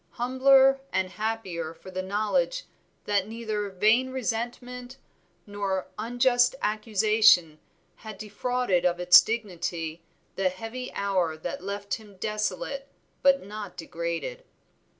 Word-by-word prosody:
Humbler 265 +2 +4
and 185 -1 0
happier 185 -7 -3
for 185 - -12
the 185 0 -3
knowledge 215 - 0 0.4
that 205 -1 +1
neither 215 -2 -3
vain 215 +7 +3
resentment 250 +1 -4 0.5
nor 200 -2 -3
unjust 245 +2 +3
accusation 210 -6 +3 0.4
had 215 -2 -9
defrauded 215 -2 -1
of 180 -1 +1
its 180 0 +9
dignity, 175 -7 -4 0.4
the 190 -1 +2
heavy 225 +7 -7
hour 185 -5 0
that 175 +3 -6
left 200 +1 -4
him 205 -3 -16
desolate 215 +7 -3 0.3
but 275 -4 +4
not 205 -2 -8
degraded. 170 - -4
210 Hz, 110 wpm, -27 LUFS, 185-245 Hz, 0.5 s, its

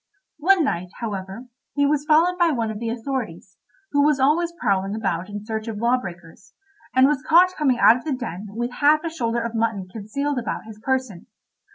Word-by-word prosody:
One 365 +2 +4
night, 180 - -2
however, 200 +1 -5 0.3
he 285 0 +3
was 290 0 +1
followed 335 +4 +3
by 345 -1 +4
one 230 -7 -1
of 210 - -6
the 230 0 -3
authorities, 230 -7 -5 0.3
who 285 - +3
was 295 -1 +3
always 320 +6 +2
prowling 195 -2 0
about 185 -4 -2
in 205 0 -7
search 220 0 -4
of 220 -2 -4
law 235 +3 +2
breakers, 175 -1 -11 0.4
and 260 0 +6
was 280 -1 +1
caught 350 +4 +5
coming 270 -5 +1
out 235 - +6
of 245 - -10
the 310 - -2
den 215 -6 -5
with 240 +4 -4
half 300 +4 +3
a 330 - -3
shoulder 235 -7 -1
of 230 0 -4
mutton 220 -4 -1
concealed 255 +6 -2
about 235 - -4
his 220 -1 -11
person. 255 -6 -2
235 Hz, 200 wpm, -23 LUFS, 210-290 Hz, 0.4 s, and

